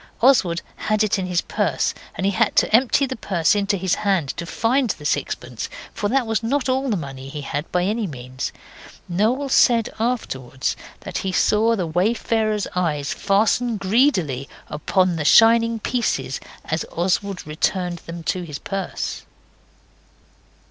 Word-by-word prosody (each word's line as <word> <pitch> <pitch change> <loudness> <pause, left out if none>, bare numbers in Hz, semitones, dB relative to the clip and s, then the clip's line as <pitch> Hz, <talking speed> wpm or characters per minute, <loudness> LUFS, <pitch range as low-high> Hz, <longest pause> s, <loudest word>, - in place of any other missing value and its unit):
Oswald 205 -10 +4
had 215 0 +1
it 210 -1 +1
in 185 - -2
his 180 -1 +1
purse, - - 0 0.2
and 190 - -2
he 200 - +3
had 220 +2 +1
to - - +4
empty 260 +3 +4
the 260 0 -4
purse 185 -6 +1
into 200 0 +1
his 185 -1 0
hand 190 -9 +1
to 170 +4 -4
find 245 +6 +1
the 150 - -4
sixpence, 120 -4 -2 0.2
for 205 - -2
that 265 +1 +2
was 225 -1 0
not 260 +3 0
all 265 +1 0
the 210 - +1
money 135 -3 -7
he 150 +1 -6
had, 145 +2 -4
by 180 0 +1
any 210 +2 0
means. 130 -3 -5 0.6
Noel 220 +10 +1
said 235 -3 +4
afterwards 135 - -2 0.3
that - - -4
he 190 - -2
saw 220 +4 +3
the 185 -5 -1
wayfarer's 215 +4 0
eyes 150 -6 0
fastened 220 +4 +1
greedily 190 - +1 0.2
upon 180 +3 +1
the 155 - -1
shining 230 +6 +6
pieces 205 - -1 0.3
as 160 +1 -1
Oswald 185 +2 -1
returned 175 +3 -1
them 170 +1 -8
to 180 +3 -1
his 155 -5 -6
purse. 195 +4 -4
195 Hz, 155 wpm, -22 LUFS, 165-225 Hz, 0.6 s, shining